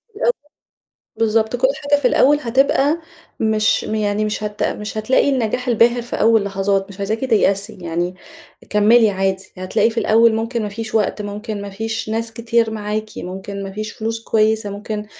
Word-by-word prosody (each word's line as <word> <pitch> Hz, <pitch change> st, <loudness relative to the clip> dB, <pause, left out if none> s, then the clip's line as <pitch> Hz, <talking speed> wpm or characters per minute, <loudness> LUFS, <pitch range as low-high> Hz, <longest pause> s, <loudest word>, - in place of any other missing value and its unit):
الأول، 485 Hz, +3 st, +2 dB, 0.8 s
بالضبط، 220 Hz, +1 st, +1 dB
كل 255 Hz, +2 st, +3 dB
حاجة 285 Hz, 0 st, +2 dB
في -, -, +3 dB
الأول 290 Hz, +2 st, +4 dB
هتبقى 270 Hz, +5 st, +2 dB, 0.4 s
مش 215 Hz, -1 st, +2 dB
يعني 215 Hz, -1 st, -1 dB
مش 215 Hz, 0 st, -3 dB
هت 210 Hz, 0 st, -4 dB
مش 210 Hz, +1 st, -3 dB
هتلاقي 255 Hz, +6 st, +2 dB
النجاح 250 Hz, -1 st, -1 dB
الباهر 235 Hz, +1 st, +3 dB
في 240 Hz, -, -5 dB
أول 225 Hz, -2 st, +4 dB
لحظات 195 Hz, 0 st, 0 dB
مش 200 Hz, 0 st, -12 dB
عايزاكِ 215 Hz, +3 st, -2 dB
تيأسي 205 Hz, -3 st, +1 dB
يعني 175 Hz, +1 st, -2 dB, 0.6 s
كمِّلي 215 Hz, +1 st, +5 dB
عادي، 190 Hz, 0 st, -1 dB
هتلاقي 185 Hz, +5 st, +1 dB
في 230 Hz, -, -4 dB
الأول 225 Hz, +1 st, +4 dB
ممكن 230 Hz, +1 st, -2 dB
ما 210 Hz, -, -2 dB
فيش 220 Hz, +2 st, -6 dB
وقت 210 Hz, -1 st, +1 dB
ممكن 205 Hz, 0 st, -5 dB
ما 200 Hz, -, -6 dB
فيش 220 Hz, +2 st, -4 dB
ناس 225 Hz, 0 st, -2 dB
كتير 230 Hz, -1 st, +1 dB
معاكِ، 215 Hz, 0 st, -3 dB
ممكن 195 Hz, +2 st, -6 dB
ما 195 Hz, -, -7 dB
فيش 215 Hz, +1 st, -5 dB
فلوس 225 Hz, +1 st, -4 dB
كويسة، 220 Hz, -1 st, +1 dB
ممكن 210 Hz, +1 st, -5 dB
215 Hz, 170 wpm, -19 LUFS, 205-230 Hz, 0.8 s, كمِّلي